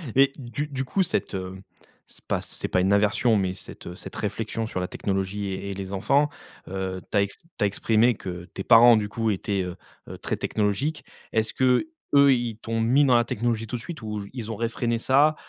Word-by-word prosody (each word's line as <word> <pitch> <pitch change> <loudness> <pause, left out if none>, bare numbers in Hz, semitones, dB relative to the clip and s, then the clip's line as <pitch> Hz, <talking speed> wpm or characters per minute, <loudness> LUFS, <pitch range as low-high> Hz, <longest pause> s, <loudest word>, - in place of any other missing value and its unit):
Et 135 +1 +5
du 140 +3 -4
du 135 -2 -3
coup, 190 +9 +1
cette, 170 - -2
heu, 95 0 -5 0.5
c'est - - -16
pas - - -1
c'est - - -4
pas 90 - +2
une 95 +2 +3
aversion, 105 +3 +3
mais 95 -2 0
cette, - - -11
heu, 90 - -7
cette - - -9
réflexion 110 +2 -3
sur 95 - -4
la 90 - -2
technologie 100 +1 -2
et 100 +1 -4
et - - -3
les 95 0 -6
enfants, 140 +9 +2 0.4
heu, 95 0 -4
tu - - +1
as - - +5
ex 100 - -5
tu 165 - -27 0.2
as - - +5
exprimé 110 +4 +2
que 90 -3 -7
tes 95 - -5
parents, 120 +1 +8
du 105 -1 -2
coup, 115 0 0
étaient, 100 0 -1
heu 90 -1 -5 0.3
heu, - - -7
très - - -3
technologiques. 110 +9 -1 0.3
Est-ce 110 0 0
qu'eux, 140 - +3
ils 120 -3 -2
t'ont 115 0 -2
mis 130 +6 +4
dans 125 - +5
la 120 0 +4
technologie 115 0 -1
tout 115 - -4
de 115 - -10
suite 165 0 -8
ou 105 -1 -4
j 100 - -9
ils 115 -4 -5
ont 110 - -3
réfréné 115 +1 -1
ça 145 +5 +4
110 Hz, 225 wpm, -25 LUFS, 100-125 Hz, 0.5 s, parents